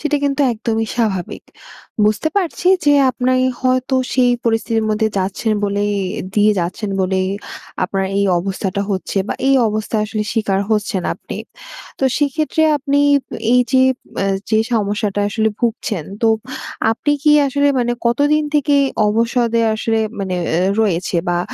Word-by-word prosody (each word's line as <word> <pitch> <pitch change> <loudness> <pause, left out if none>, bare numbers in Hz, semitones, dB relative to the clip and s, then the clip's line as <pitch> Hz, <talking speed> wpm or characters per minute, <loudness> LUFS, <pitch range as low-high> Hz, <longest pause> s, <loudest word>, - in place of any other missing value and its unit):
সেটা 300 -1 0
কিন্তু 280 +1 0
একদমই 225 0 -2
স্বাভাবিক। 200 -7 -2 0.6
বুঝতে 215 +9 +1
পারছি 360 -2 -1 0.2
যে 290 - +5 0.2
আপনি 255 0 0 0.3
হয়তো 255 0 +1 0.2
সেই 250 -1 +3
পরিস্থিতির 225 -1 0
মধ্যে 220 +1 +1
যাচ্ছেন 195 +4 -1
বলেই 205 +1 0 0.4
দিয়ে 210 0 +4
যাচ্ছেন 185 +4 -3
বলেই 185 0 0 0.6
আপনার 195 +1 -1
এই 200 - +2
অবস্থাটা 190 +1 -3
হচ্ছে 195 +1 -2
বা, - - -1
এই 275 - +5
অবস্থায় 215 0 -1
আসলে 215 0 -2
শিকার 200 -3 0
হচ্ছেন 205 -2 0
আপনি। - - -9 0.6
তো 270 - 0
সেক্ষেত্রে 305 +2 0
আপনি 285 0 0 0.6
এইযে, 250 +1 +3 0.4
মা - - 0 0.3
যে 220 - +3
সমস্যাটা 205 -2 0
আসলে 220 +1 +1
ভুগছেন 220 -7 -2 0.2
তো 225 - +4 0.6
আপনি 290 +6 0
কি 300 -1 +5
আসলে 285 +1 +1
মানে 240 -1 0
কতদিন 290 +6 +2
থেকে 290 0 +2 0.3
অবসাদে 230 +1 +1
আসলে 225 0 0 0.2
মানে 185 -2 -2
এ 165 0 0 0.2
রয়েছে? 180 -4 0
বা, 175 0 +1
220 Hz, 140 wpm, -18 LUFS, 200-255 Hz, 0.6 s, যে